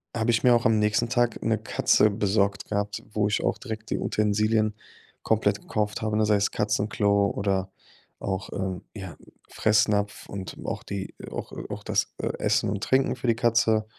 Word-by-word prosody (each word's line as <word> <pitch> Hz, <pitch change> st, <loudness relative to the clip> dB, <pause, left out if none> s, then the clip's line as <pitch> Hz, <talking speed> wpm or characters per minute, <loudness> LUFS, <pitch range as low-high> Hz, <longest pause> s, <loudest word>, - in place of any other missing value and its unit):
habe 115 Hz, +1 st, +1 dB
ich 115 Hz, -, +1 dB
mir 125 Hz, -1 st, +6 dB
auch 115 Hz, -, 0 dB
am 110 Hz, -1 st, +4 dB
nächsten 105 Hz, +2 st, +1 dB
Tag 120 Hz, -2 st, +1 dB
'ne 110 Hz, -1 st, +2 dB
Katze 110 Hz, 0 st, +3 dB
besorgt 100 Hz, -1 st, 0 dB
gehabt, 105 Hz, 0 st, -2 dB
wo 105 Hz, -1 st, +2 dB
ich 105 Hz, -, 0 dB
auch -, -, +1 dB
direkt 110 Hz, -3 st, -7 dB
die -, -, 0 dB
Utensilien 110 Hz, +1 st, +1 dB, 0.5 s
komplett 105 Hz, -2 st, +1 dB
gekauft 105 Hz, -1 st, -2 dB
habe, 110 Hz, -1 st, 0 dB
ne? 110 Hz, -, +3 dB
Sei 105 Hz, 0 st, +3 dB
es 100 Hz, 0 st, +1 dB
Katzenklo 105 Hz, -1 st, +1 dB
oder 95 Hz, -1 st, -1 dB, 0.5 s
auch, 95 Hz, +1 st, -3 dB
ähm, 95 Hz, -2 st, -3 dB
ja, 95 Hz, -6 st, -7 dB, 0.3 s
Fressnapf 105 Hz, -1 st, +1 dB
und 95 Hz, -1 st, -6 dB
auch -, -, -3 dB
die, 100 Hz, -1 st, -5 dB
äh -, -, -8 dB
auch -, -, -6 dB, 0.2 s
auch -, -, -6 dB
das, -, -, 0 dB
äh, -, -, -1 dB
Essen -, -, +1 dB
und 100 Hz, +1 st, -3 dB
Trinken 130 Hz, 0 st, +2 dB
für 125 Hz, -, -5 dB
die 115 Hz, -, +4 dB
Katze. 115 Hz, -2 st, +2 dB
105 Hz, 185 wpm, -26 LUFS, 100-110 Hz, 0.5 s, mir